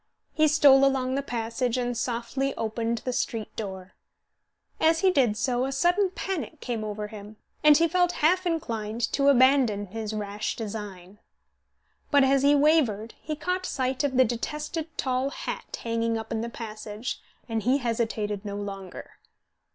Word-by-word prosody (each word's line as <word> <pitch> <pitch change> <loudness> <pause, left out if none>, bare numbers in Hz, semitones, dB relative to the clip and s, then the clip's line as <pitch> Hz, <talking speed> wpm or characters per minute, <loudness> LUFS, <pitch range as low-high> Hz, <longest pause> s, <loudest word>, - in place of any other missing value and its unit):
He 310 0 +4
stole 280 -3 +6
along 265 -1 +2
the 275 - 0
passage, 235 -1 -2
and 245 -1 -1
softly 245 +3 -2
opened 230 +1 -2
the 255 - -1
street 225 -2 -3
door. 190 -3 -6 0.9
As 325 +1 +3
he 380 -1 +5
did 245 -10 +2
so 250 0 0
a 270 - -1
sudden 350 +8 +2
panic 335 -5 -4
came 235 -5 -3
over 210 0 -4
him, 210 0 -10 0.3
and 300 -1 +8
he 335 +1 +4
felt 355 +1 +2
half 360 +4 +2
inclined 230 -9 -3
to 280 0 +2
abandon 260 -6 +4
his 215 +2 -5
rash 210 0 -3
design. 205 -3 -7 0.9
But 285 -2 +5
as 270 0 +3
he 285 +1 +5
wavered 275 -8 +2
he 305 - -4
caught 365 +4 -2
sight 260 +1 -1
of 270 -3 0
the 260 - +6
detested 300 +7 -3
tall 260 +1 0
hat - - -6
hanging 230 0 0
up 220 0 -7
in 225 -1 -1
the 235 - -3
passage, 215 0 -6 0.3
and 225 -2 -1
he 255 +5 +3
hesitated 220 -5 -2
no 200 -1 -5
longer. 195 -2 -7
245 Hz, 160 wpm, -26 LUFS, 220-285 Hz, 0.9 s, and